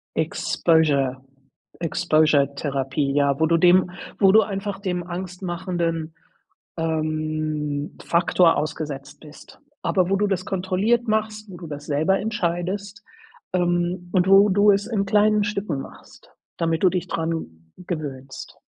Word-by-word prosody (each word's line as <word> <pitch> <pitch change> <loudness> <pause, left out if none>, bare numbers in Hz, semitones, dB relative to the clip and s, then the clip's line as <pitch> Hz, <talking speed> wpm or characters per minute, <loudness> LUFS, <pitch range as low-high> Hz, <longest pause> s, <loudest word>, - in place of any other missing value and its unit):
Exposure 155 -4 +1 0.6
Exposure 155 -3 +3
Therapie, 140 0 -1
ja, 140 -1 +2
wo 160 - +4
du 165 +1 +3
dem 180 +1 +4 0.3
wo 195 -1 +6
du 220 +2 +7
einfach 195 -1 -4
dem 180 -3 -2
angstmachenden, 175 -2 -4 0.6
ähm, 155 -2 -2
Faktor 170 0 +3
ausgesetzt 150 -3 -5
bist, 150 -1 -15 0.2
aber 185 -1 +1
wo 195 - +3
du 205 +1 +1
das 190 -2 -1
kontrolliert 195 +6 0
machst, 215 -1 -1
wo 180 - -9
du 170 - -9
das 145 0 -7
selber 155 +7 +1
entscheidest, 200 +1 -3 0.5
ähm, 175 0 0
und 180 -1 +3
wo 195 +2 +7
du 205 +1 +4
es 200 +1 0
in 215 -4 -1
kleinen 210 +1 +3
Stücken 200 -8 -2
machst, - - -14 0.2
damit 165 -1 -1
du 190 - +6
dich 180 -1 -2
dran 160 - -4
gewöhnst. 140 -7 -7
175 Hz, 130 wpm, -23 LUFS, 155-195 Hz, 0.6 s, du